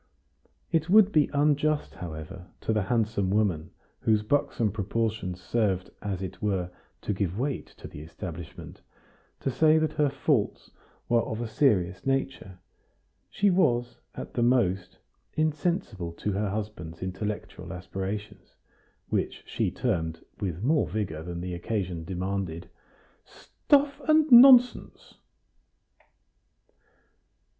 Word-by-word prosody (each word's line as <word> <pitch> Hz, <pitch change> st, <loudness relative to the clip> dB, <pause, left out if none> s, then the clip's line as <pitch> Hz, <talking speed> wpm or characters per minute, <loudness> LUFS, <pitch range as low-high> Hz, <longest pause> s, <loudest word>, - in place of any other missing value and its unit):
It 165 Hz, 0 st, +1 dB
would 210 Hz, +1 st, +6 dB
be 155 Hz, -5 st, +3 dB
unjust, 150 Hz, +1 st, +1 dB
however, 90 Hz, +2 st, -8 dB
to 110 Hz, -, 0 dB
the 110 Hz, -, +1 dB
handsome 105 Hz, -2 st, 0 dB
woman, 95 Hz, -6 st, +1 dB, 0.3 s
whose 110 Hz, -1 st, +2 dB
buxom 140 Hz, -3 st, +1 dB
proportions 105 Hz, -2 st, -2 dB
served, 100 Hz, -4 st, -1 dB
as 95 Hz, -2 st, -3 dB
it 95 Hz, -1 st, -7 dB
were, 95 Hz, -4 st, -1 dB, 0.3 s
to -, -, -1 dB
give 95 Hz, -1 st, -2 dB
weight 135 Hz, +2 st, -2 dB
to -, -, -9 dB
the 75 Hz, -, -10 dB
establishment, 80 Hz, +1 st, -9 dB, 0.6 s
to 135 Hz, -, -1 dB
say 155 Hz, +4 st, +4 dB
that 155 Hz, 0 st, 0 dB
her 150 Hz, -1 st, +2 dB
faults 135 Hz, -4 st, -1 dB, 0.4 s
were 120 Hz, -1 st, +3 dB
of 110 Hz, -1 st, -4 dB
a 120 Hz, -, -2 dB
serious 100 Hz, -7 st, +1 dB
nature; 135 Hz, -8 st, -2 dB, 0.7 s
she 205 Hz, -1 st, +2 dB
was, 120 Hz, -9 st, +1 dB, 0.2 s
at -, -, -7 dB
the 120 Hz, -, -1 dB
most, 95 Hz, -7 st, +1 dB, 0.4 s
insensible 150 Hz, -, -1 dB
to 105 Hz, -, -3 dB
her 100 Hz, +1 st, -1 dB
husband's 95 Hz, -5 st, -5 dB
intellectual 95 Hz, -1 st, -5 dB
aspirations, 95 Hz, +2 st, -6 dB, 0.5 s
which -, -, -2 dB
she -, -, -1 dB
termed, 80 Hz, -9 st, -2 dB
with 90 Hz, -1 st, -3 dB
more 150 Hz, +4 st, +2 dB
vigor 90 Hz, -8 st, -3 dB
than 85 Hz, +1 st, -6 dB
the 90 Hz, 0 st, -4 dB
occasion 90 Hz, -2 st, -3 dB
demanded, 90 Hz, -1 st, -4 dB, 0.5 s
"stuff 285 Hz, 0 st, 0 dB
and 310 Hz, -1 st, +4 dB
nonsense." 250 Hz, 0 st, +6 dB
105 Hz, 120 wpm, -27 LUFS, 90-135 Hz, 0.7 s, would